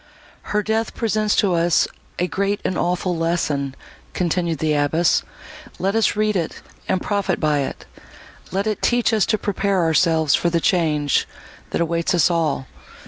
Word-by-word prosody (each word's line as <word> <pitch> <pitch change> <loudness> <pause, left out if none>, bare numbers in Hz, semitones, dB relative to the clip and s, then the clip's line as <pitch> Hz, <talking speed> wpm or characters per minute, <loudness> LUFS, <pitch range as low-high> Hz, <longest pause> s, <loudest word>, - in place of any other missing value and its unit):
"Her 210 - +2
death 220 +1 -1
presents 215 -2 +1
to 195 -3 +2
us 170 0 +3 0.3
a 180 - +1
great 200 +2 -1
and 185 - 0
awful 180 +1 0
lesson," 155 -5 -1 0.4
continued 170 -2 0
the 155 +1 0
abbess; 150 +4 +2 0.6
"let 195 +2 0
us 225 - +2
read 215 0 +1
it, 170 -4 -3 0.3
and 185 - +2
profit 200 -1 -1
by 150 -2 +1
it; 135 - -4 0.7
let 195 +2 -1
it 215 -2 -2
teach 240 -1 +2
us 215 -4 +2
to 215 - +2
prepare 200 -2 0
ourselves 160 -2 +3
for 175 - +2
the 170 0 +1
change, 155 -5 +1 0.4
that - - -1
awaits 170 +1 0
us 175 +1 +3
all! 160 -5 0
175 Hz, 160 wpm, -21 LUFS, 160-200 Hz, 0.7 s, us